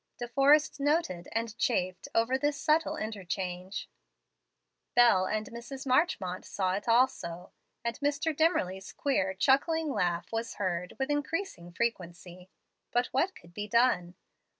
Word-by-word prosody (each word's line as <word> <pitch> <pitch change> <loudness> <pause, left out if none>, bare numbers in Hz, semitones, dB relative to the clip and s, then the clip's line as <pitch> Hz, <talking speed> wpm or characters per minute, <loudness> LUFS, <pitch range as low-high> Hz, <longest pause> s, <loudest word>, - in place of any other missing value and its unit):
De 240 - -4
Forrest 285 +5 +4
noted 280 - 0
and 225 -1 -2
chafed 185 -6 0
over 230 +3 +3
this 290 +1 0
subtile 310 +1 +2
interchange. 185 -3 -4 1.1
Bel 220 -6 +5
and 215 0 -1
Mrs. 245 +4 -8
Marchmont 250 - +1
saw 185 -2 -1
it 205 +4 -3
also, 230 -8 +1 0.3
and 235 +2 -3
Mr. 290 +2 0
Dimmerly's 195 - +1
queer 195 -9 0
chuckling 295 - +2
laugh 175 -1 -1
was 230 +1 -3
heard 180 -2 -2
with 265 +2 -1
increasing 290 - -3
frequency. 180 -3 -4 0.4
But 245 +1 +1
what 345 +9 +1
could 170 0 -16
be 210 +2 -4
done? 210 -7 +2
230 Hz, 130 wpm, -30 LUFS, 185-280 Hz, 1.1 s, Bel